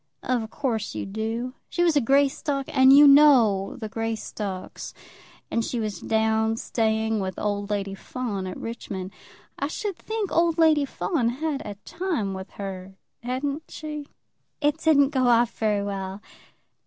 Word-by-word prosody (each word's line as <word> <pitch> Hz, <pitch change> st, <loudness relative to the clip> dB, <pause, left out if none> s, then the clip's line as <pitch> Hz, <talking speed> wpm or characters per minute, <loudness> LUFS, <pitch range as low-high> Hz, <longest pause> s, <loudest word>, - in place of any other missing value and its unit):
"Of 240 Hz, -4 st, -1 dB
course 225 Hz, -5 st, -2 dB
you -, -, -3 dB
do. 225 Hz, +5 st, -3 dB, 0.2 s
She 350 Hz, -, 0 dB
was 335 Hz, -3 st, +3 dB
a 290 Hz, -, +4 dB
Greystock, 275 Hz, +2 st, +1 dB
and 265 Hz, 0 st, +7 dB
you 290 Hz, +1 st, +9 dB
know 255 Hz, -9 st, +6 dB
the 220 Hz, -, -6 dB
Greystocks. 215 Hz, -3 st, -5 dB, 0.6 s
And 230 Hz, -, +1 dB
she 240 Hz, -, -3 dB
was 210 Hz, -5 st, -3 dB
down 220 Hz, 0 st, +1 dB
staying 220 Hz, -1 st, 0 dB
with 190 Hz, -2 st, -4 dB
old 205 Hz, -1 st, -2 dB
Lady 200 Hz, -1 st, -2 dB
Fawn 200 Hz, -2 st, -4 dB
at 185 Hz, -, -6 dB
Richmond. 200 Hz, -5 st, -6 dB, 0.5 s
I 280 Hz, -, 0 dB
should 400 Hz, +5 st, -4 dB
think 440 Hz, -3 st, -3 dB
old 335 Hz, -1 st, +2 dB
Lady 315 Hz, -3 st, +4 dB
Fawn 270 Hz, -3 st, -1 dB
had 285 Hz, +3 st, -2 dB
a 205 Hz, -1 st, -6 dB
time 330 Hz, -, -2 dB
with 190 Hz, +1 st, -7 dB
her; 190 Hz, -1 st, -7 dB, 0.3 s
hadn't 275 Hz, +5 st, -3 dB
she?" 300 Hz, -2 st, -6 dB, 0.5 s
"It 295 Hz, +1 st, +1 dB
didn't 285 Hz, -4 st, +4 dB
go 260 Hz, -4 st, +1 dB
off 235 Hz, -1 st, +3 dB
very 210 Hz, -2 st, 0 dB
well." 195 Hz, -1 st, -4 dB
230 Hz, 155 wpm, -25 LUFS, 205-285 Hz, 0.6 s, you